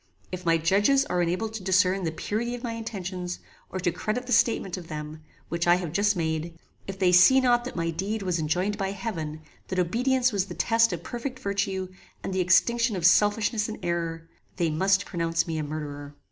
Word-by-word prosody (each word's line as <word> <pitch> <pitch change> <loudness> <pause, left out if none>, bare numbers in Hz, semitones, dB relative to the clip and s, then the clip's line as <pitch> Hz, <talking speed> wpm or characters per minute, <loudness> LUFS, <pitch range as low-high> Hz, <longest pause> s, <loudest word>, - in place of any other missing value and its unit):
If 180 -1 -6
my 165 0 +4
judges 205 - +3
are 180 0 0
unable 180 +6 0
to 220 -1 -7
discern 185 0 +2
the 160 - -1
purity 225 +8 -3
of 245 - -10
my 235 - -2
intentions, 190 -6 -5 0.3
or 190 - -4
to 175 - +1
credit 220 +8 -3
the 250 - -7
statement 220 -5 +2
of 180 -3 -9
them, 155 0 -7 0.3
which 170 +1 -2
I 175 - +6
have 175 -4 -4
just 205 +1 +2
made; 165 0 -2 0.3
if 195 0 -6
they 185 -2 +3
see 185 +9 +7
not 245 -2 +2
that 255 - -6
my 165 -1 -1
deed 195 +6 -3
was 180 -3 -1
enjoined 180 +7 -1
by 195 0 -1
heaven; 165 -7 -5 0.3
that 185 - -4
obedience 250 +8 +2
was 200 -2 -1
the - - -8
test 230 0 +3
of - - -5
perfect 250 +2 -5
virtue, 200 -5 -2 0.4
and 195 - -3
the 185 - +1
extinction 230 +5 +3
of 175 -3 -2
selfishness 210 +3 +3
and 220 - -5
error, 165 -1 -2 0.3
they 170 -3 0
must 190 +5 +2
pronounce 165 -2 -1
me 160 -2 -3
a - - -2
murderer. 145 -1 -6
185 Hz, 205 wpm, -26 LUFS, 170-220 Hz, 0.4 s, see